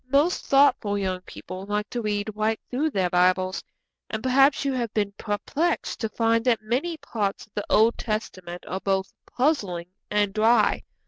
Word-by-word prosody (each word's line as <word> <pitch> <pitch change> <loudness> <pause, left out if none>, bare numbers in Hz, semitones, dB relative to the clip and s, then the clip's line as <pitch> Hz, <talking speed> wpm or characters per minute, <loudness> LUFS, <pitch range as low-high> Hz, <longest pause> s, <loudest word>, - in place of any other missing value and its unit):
Most 290 +6 +2
thoughtful 270 -7 +4
young 185 -2 -2
people 185 +2 -8
like 210 0 -1
to 240 - -2
read 210 0 -2
right 215 +1 0
through 285 +5 +1
their 190 - 0
Bibles, 185 +1 +2 0.5
and 220 0 -4
perhaps 270 +2 +4
you 275 - +1
have 240 -4 -2
been 205 -2 +1
perplexed 280 +12 -2
to 220 - -2
find 230 +1 +1
that 240 -3 +3
many 270 +10 -1
parts 205 -9 -3
of 210 - -36
the 205 - -3
Old 225 +2 +4
Testament 185 -5 -4
are 190 - -3
both 190 0 -1
puzzling 200 - 0 0.2
and 205 -1 +1
dry. 220 +1 +3
215 Hz, 170 wpm, -25 LUFS, 195-250 Hz, 0.5 s, thoughtful